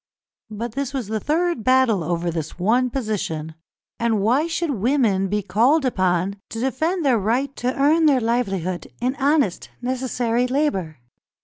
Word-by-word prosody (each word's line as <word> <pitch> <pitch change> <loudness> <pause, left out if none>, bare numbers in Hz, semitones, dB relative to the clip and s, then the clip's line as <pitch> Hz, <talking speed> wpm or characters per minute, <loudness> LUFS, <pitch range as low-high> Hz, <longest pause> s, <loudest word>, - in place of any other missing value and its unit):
But 220 +2 -5
this 275 +2 -4
was 245 -6 -3
the 220 0 -1
third 325 -1 0
battle 255 -6 +3
over 170 +1 -1
this 160 -2 -5
one 235 +8 +2
position; 205 - -3 0.5
and 230 -2 +1
why 250 +10 +2
should 335 -1 -1
women 225 -5 +1
be 205 +1 -1
called 260 - +3
upon 185 -4 0
to 225 - -6
defend 315 +8 -1
their 250 -5 +3
right 250 +7 0
to 255 +3 -2
earn 310 +3 +4
their 275 -3 +4
livelihood 195 -7 -1
in 250 +2 -1
honest, 280 - +1
necessary 250 -1 -1
labour? 250 - -1
240 Hz, 150 wpm, -22 LUFS, 200-275 Hz, 0.5 s, earn